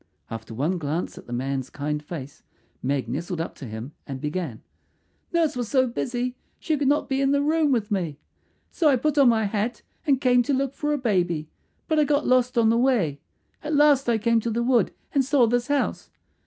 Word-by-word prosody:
After 115 0 -7
one 160 +9 0
glance 155 +3 -3
at - - -15
the - - -10
man's 130 +1 -2
kind 150 +1 -3
face 150 -2 -8 0.4
Meg 135 -2 -1
nestled 170 +8 -3
up 165 - -3
to 140 - -8
him 110 +4 -7 0.2
and 135 -2 -5
began, 150 -5 -4 0.7
"Nurse 330 -4 +1
was 245 -3 -3
so 260 -2 +3
busy 245 0 -2 0.2
she 315 - -1
could 285 -2 0
not 290 +2 +2
be 270 -1 0
in 270 - +3
the 285 0 +3
room 310 0 +2
with 225 -5 0
me. 170 -8 -1 0.5
"So 320 -4 +3
I 275 - +5
put 295 +3 +1
on 270 -3 +7
my 225 -2 +2
hat 210 +2 -2 0.2
and 275 -3 +4
came 250 -2 +4
to 275 +3 0
look 270 0 -1
for 295 +1 -2
a 295 - +1
baby; 175 - 0 0.4
but 315 -1 +2
I - - +5
got 290 0 +1
lost 250 -1 +2
on 225 -1 +5
the 230 +1 +3
way. 215 - +2 0.4
At 305 0 -2
last 285 -3 +4
I 235 - +3
came 230 +1 +2
to 230 - -2
the 235 +1 0
wood 245 -1 +3 0.2
and 275 -2 +3
saw 270 -2 +4
this 240 +1 0
house. 285 -1 -1
235 Hz, 215 wpm, -25 LUFS, -, 0.7 s, on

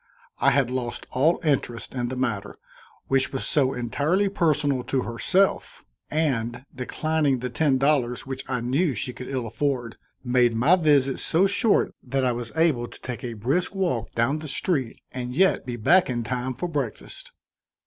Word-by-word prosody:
I - - +4
had 135 -2 +2
lost 120 -2 -4
all 155 +7 +2
interest 135 -6 -1
in 125 -2 -2
the 130 - -4
matter, 120 -6 -2 0.5
which 135 0 +1
was 130 -6 -3
so 135 +4 +2
entirely 150 - 0
personal 150 -8 +1
to 130 -2 0
herself, 185 +12 0 0.2
and, 125 -5 -1
declining 145 +2 0
the 125 0 -4
ten 140 0 +2
dollars 130 -3 +1
which 135 0 -5
I 125 -2 -1
knew 135 +5 +1
she 130 -2 -3
could 125 - -8
ill 130 -3 -3
afford, 120 -1 -2 0.3
made 120 -2 +3
my 140 +11 +5
visit 145 -6 +2
so 170 +4 +2
short 200 +2 +2
that 135 +1 -1
I 125 - +2
was 120 -1 -5
able 155 -7 +2
to - - -14
take 125 -2 -6
a 120 -2 -4
brisk 140 - -1
walk 175 -12 -1
down 130 +6 +1
the 155 - -7
street 135 -3 0
and 125 0 -5
yet 190 -7 +3
be 120 - -3
back 175 - +4
in 120 -2 -1
time 125 +2 -3
for 155 +8 -3
breakfast. 140 -9 -5
130 Hz, 175 wpm, -25 LUFS, 120-150 Hz, 0.5 s, my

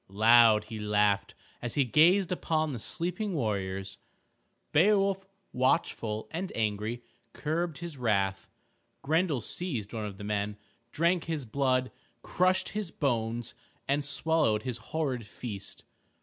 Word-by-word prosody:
Loud 110 +1 +6
he 110 0 -7
laughed 105 -1 +1 0.3
as 120 - -3
he 140 - +3
gazed 175 - +4
upon 155 -4 0
the 120 - -4
sleeping 180 - -2
warriors. 100 -5 -2 0.7
Beowulf, 195 +2 +3 0.3
watchful 120 -4 0
and 180 +3 -3
angry, 110 +2 -2 0.3
curbed 160 0 -2
his 170 -4 -7
wrath. 100 -5 0 0.5
Grendel 160 -2 +1
seized 120 - -4
one 110 -2 -3
of 100 -2 -8
the 105 - -8
men, 105 0 -2 0.3
drank 170 +2 +1
his 160 -5 -3
blood, 130 +1 +1 0.3
crushed 185 +1 +2
his 210 -3 -3
bones, 120 -5 -1 0.3
and 145 +1 +1
swallowed 145 -6 +1
his 125 -3 -3
horrid 130 0 -2
feast. 100 -2 -7
125 Hz, 125 wpm, -29 LUFS, 105-165 Hz, 0.7 s, Loud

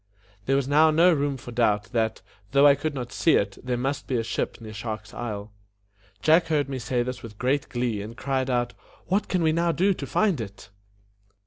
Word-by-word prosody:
There 135 - +3
was 135 -1 +1
now 155 +3 +5
no 170 +3 +5
room 145 -2 0
for 120 -1 -10
doubt 105 -4 +1
that, 110 -2 -1 0.3
though 140 +1 +6
I 145 - +8
could 145 +1 -3
not 125 -2 -5
see 165 - +3
it, 100 -1 0
there 125 -1 -1
must 135 +3 -2
be 130 - 0
a 115 - 0
ship 115 - -3
near 110 -2 -9
Shark's 110 0 -6
Isle. 105 -3 -5 0.7
Jack 165 +2 +5
heard 150 -4 +1
me 135 -1 -4
say 120 +1 0
this 125 +1 -5
with 110 -3 -10
great 130 +4 0
glee, 120 -5 -1
and 110 +4 -8
cried 130 0 -1
out, 120 -1 0 0.3
"What 195 +3 0
can 180 -2 0
we 160 - +4
now 170 +1 +2
do 190 +4 +2
to - - -6
find 195 - +1
it?" 100 -2 -9
130 Hz, 215 wpm, -25 LUFS, 115-150 Hz, 0.7 s, I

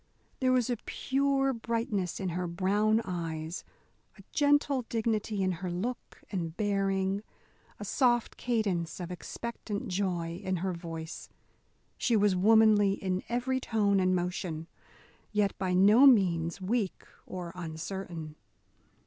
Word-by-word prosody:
There 260 -1 +3
was 250 -2 +3
a 240 - 0
pure 270 +3 0
brightness 225 -6 -2
in 190 - -2
her 180 +1 -2
brown 205 +5 +2
eyes, 165 -2 -4 0.5
a - - -14
gentle 290 -2 +3
dignity 220 -3 0
in 185 - +2
her 185 - -2
look 215 +9 -5
and 170 -4 -3
bearing, 195 -1 0 0.6
a - - -5
soft 240 -3 +2
cadence 200 -9 -1
of 180 0 -5
expectant 220 +3 -5
joy 180 -2 -2
in 190 -1 0
her 185 - 0
voice. 165 -1 -7 0.7
She 235 - +2
was 205 -2 +4
womanly 210 0 +5
in 185 -1 -2
every 250 +2 0
tone 205 -5 +2
and 185 0 +3
motion, 175 -2 -3 0.7
yet 210 -2 +1
by 185 -1 0
no 210 +9 +7
means 175 -9 +3
weak 200 +1 -1 0.2
or 180 -2 -6
uncertain. 165 -1 -6
195 Hz, 130 wpm, -30 LUFS, 180-225 Hz, 0.7 s, no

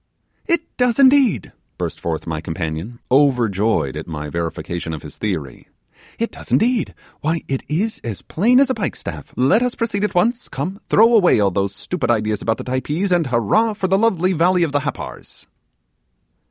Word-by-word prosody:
'It 340 -2 +1
does, 245 -2 +2
indeed,' 260 - +4 0.3
burst - - -4
forth 80 -2 -3
my 80 -2 -3
companion, 80 +7 -4
overjoyed 115 - +2
at - - -6
my 75 -2 -5
verification 85 0 -4
of 75 - -7
his 75 - -9
theory, 80 - -4 0.5
'it 230 - -2
does - - -11
indeed; 240 0 +2 0.2
why, 160 +2 -1
it 135 -1 -2
is 200 +9 -1
as 110 -5 -5
plain 240 +9 +3
as 275 -1 +4
a - - +2
pike 215 -5 -3
staff. - - -8
Let 140 - +4
us 250 -1 0
proceed 210 -3 -2
at 210 - -1
once; 235 +7 +1
come, 180 +9 -4
throw 230 +3 +5
away 195 - +5
all 100 -2 +3
those 100 +1 -1
stupid 175 - -3
ideas 110 -2 +1
about 115 0 0
the - - -6
Typees, 150 +9 -1
and 175 -4 +2
hurrah 125 - +2
for 200 -2 -2
the 195 +1 +2
lovely 190 -5 +2
valley 180 +2 +3
of 160 - 0
the 145 - +1
Happars. - - -6
150 Hz, 180 wpm, -20 LUFS, -, 0.5 s, throw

